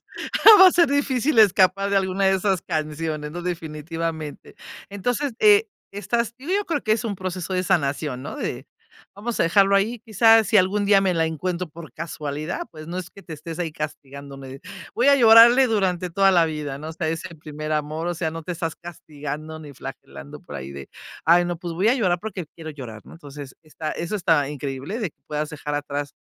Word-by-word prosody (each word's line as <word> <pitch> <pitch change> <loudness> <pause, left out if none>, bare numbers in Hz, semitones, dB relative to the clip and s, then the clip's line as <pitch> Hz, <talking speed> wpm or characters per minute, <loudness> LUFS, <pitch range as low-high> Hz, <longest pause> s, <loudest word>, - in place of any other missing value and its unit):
Entonces - - -62 0.6
va 380 - +11
a - - +8
ser 340 -3 +4
difícil 280 -1 +1
escapar 195 -1 +4
de 200 - +1
alguna 190 0 0
de 190 - +4
esas 190 -1 0
canciones, 155 -1 -3
¿no?, 175 - -5
definitivamente. 160 -2 -5 0.4
Entonces, 245 +8 -2
eh, 420 +1 +5 0.2
estás 235 +3 -2
Yo 375 +10 -1
creo 310 -5 -1
que 215 - +1
es 220 +1 -1
un 210 -3 -3
proceso 185 0 -4
de 185 - +1
sanación, 145 -7 -1
¿no?, 140 - -7
de 125 +3 -5 0.5
vamos 230 +3 -4
a - - +5
dejarlo 195 +3 +4
ahí, 220 +4 +1
quizás 225 0 +4
si 210 -1 +5
algún 200 +3 +2
día 200 -1 +5
me 190 -2 +1
la 165 0 +2
encuentro 170 +3 -3
por 160 0 -12
casualidad, 155 -1 -5
pues 155 -1 -11
no 175 +2 -5
es 180 -1 -6
que 200 - -15
te 170 - -10
estés 160 +2 -8
ahí 165 -3 -3
castigándome. 140 -2 -8 0.3
Voy 250 +4 +3
a 280 - +7
llorarle 235 +2 +8
durante 185 -5 0
toda 195 +3 +4
la 175 -3 +4
vida, 150 -3 -4
¿no?, 155 +2 -7
o 160 - -6
sea 160 0 -3
ese 165 +1 -4
primer 155 0 -6
amor, 155 +2 -2
o 175 - 0
sea, 160 -1 -2
no 165 0 -7
te 180 - -5
estás 165 -1 -4
castigando 155 -2 -8
ni 150 -2 -11
flagelando 70 - -10
por - - -9
ahí 65 +1 -7
de: 70 -1 -10 0.3
"Ay, 175 +2 +5
no, 175 -1 -3
pues 170 0 -6
voy 185 +6 +1
a 245 - +4
llorar 185 -9 +1
porque 195 -4 -5
quiero 160 -2 -9
llorar", 125 -7 -9
¿no? - - -13
Entonces, 145 -4 -11
está 155 0 -6
eso 170 +5 -4
está 165 -7 +2
increíble, 140 - -5
de 210 -8 -3
que - - -52
puedas 150 0 -3
dejar 150 -1 -5
atrás 145 0 -4
170 Hz, 210 wpm, -23 LUFS, 150-200 Hz, 0.6 s, va